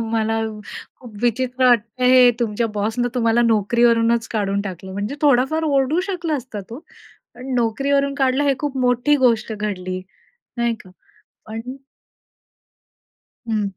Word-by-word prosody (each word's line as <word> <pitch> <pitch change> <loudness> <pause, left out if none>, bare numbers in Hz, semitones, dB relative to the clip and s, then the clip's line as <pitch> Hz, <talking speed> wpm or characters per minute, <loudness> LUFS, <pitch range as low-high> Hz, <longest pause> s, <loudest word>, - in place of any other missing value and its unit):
मला 225 0 0 0.6
खूप 235 -4 -12
विचित्र 255 +2 +1
वाटतंय 240 +2 +2
हे 250 -1 +7
तुमच्या 230 0 0
बॉसनं 220 +4 -1
तुम्हाला 235 -1 +2
नोकरीवरूनच 230 +1 +2
काढून 200 -2 -1
टाकलं 190 -1 -7
म्हणजे 205 +7 -3
थोडाफार 285 +3 +3
ओरडू 280 +2 +1
शकला 345 -5 -2
असता 235 -5 -7
तो, 235 - -7 0.6
पण 255 +1 -6
नोकरीवरून 275 +4 +1
काढलं 265 0 +1
हे 280 -1 +3
खूप 285 -3 -3
मोठी 245 +4 +2
गोष्ट 225 -2 +1
घडली 185 -3 -4 0.6
नाही 235 -1 0
का? 185 - -15 0.6
पण 220 0 -6 1.9
हं. 205 -4 -2
235 Hz, 125 wpm, -20 LUFS, 215-260 Hz, 1.9 s, हे